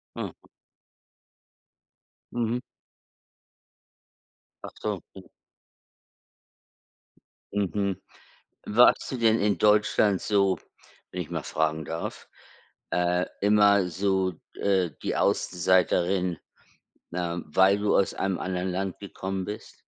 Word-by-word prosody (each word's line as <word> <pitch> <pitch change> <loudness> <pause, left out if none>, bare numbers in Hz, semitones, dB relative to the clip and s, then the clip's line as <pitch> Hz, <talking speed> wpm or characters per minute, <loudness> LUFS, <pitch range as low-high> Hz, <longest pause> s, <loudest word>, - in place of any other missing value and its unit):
Aha. - - -7 1.9
Mhm. 120 0 0 2.0
Ach - - -7
so, - - -2 0.2
mhm. - - -12 2.2
Mhm. 100 -1 -1 0.7
Warst 120 +4 +4
du 130 - -3
denn 115 -1 +3
in 100 -2 +1
Deutschland 105 -1 +3
so, 100 -3 +2 0.5
wenn- 90 - -3
ich 80 - -7
mal - - -3
fragen 80 0 -1
darf- 80 +3 -6 0.6
äh, 90 0 +1 0.2
immer 100 -2 +5
so 95 +1 +1 0.2
d - - -13
äh, 95 -6 +1
die - - -1
Außenseiterin, 90 0 +2 0.7
ne, 85 -1 -3
weil 95 +6 +4
du 105 0 +2
aus 100 - +2
einem 95 -2 -1
anderen 90 0 -2
Land 95 +1 -3
gekommen 95 -1 -4
bist? 105 +2 -8
95 Hz, 100 wpm, -27 LUFS, 90-100 Hz, 2.2 s, immer